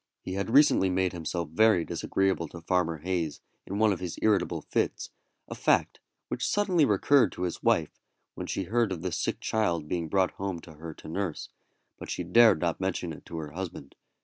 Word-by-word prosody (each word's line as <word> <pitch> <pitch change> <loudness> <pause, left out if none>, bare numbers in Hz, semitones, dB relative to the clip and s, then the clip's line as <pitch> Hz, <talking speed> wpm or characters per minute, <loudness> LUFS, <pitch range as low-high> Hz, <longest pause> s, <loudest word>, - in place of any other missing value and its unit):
He 95 - -5
had 100 +2 -2
recently 135 -7 +5
made 95 0 0
himself 85 -1 -3
very 95 0 +4
disagreeable 95 -3 0
to 85 - -10
Farmer 85 -1 0
Hayes 85 -3 -2 0.3
in 100 - -3
one 110 -1 +4
of 90 - -5
his 90 -3 -5
irritable 105 -2 +1
fits, - - -2 0.4
a - - -6
fact - - +1 0.3
which 125 - -4
suddenly 185 -1 +2
recurred 115 +1 +4
to 90 - -5
his 90 - -3
wife - - +1 0.3
when - - -6
she 95 - -2
heard 115 +3 +1
of 90 -2 -4
the 90 - -2
sick - - -2
child 85 -8 0
being 85 0 -2
brought 95 0 +2
home 95 -2 -4
to 80 - -13
her 80 +1 -9
to - - -12
nurse, 85 0 -3 0.5
but - - -8
she - - -3
dared 105 +1 +6
not 85 +1 -1
mention 90 -3 -2
it - - -13
to 85 - -6
her 75 -2 -5
husband. 90 -4 -7
90 Hz, 200 wpm, -28 LUFS, 85-100 Hz, 0.5 s, dared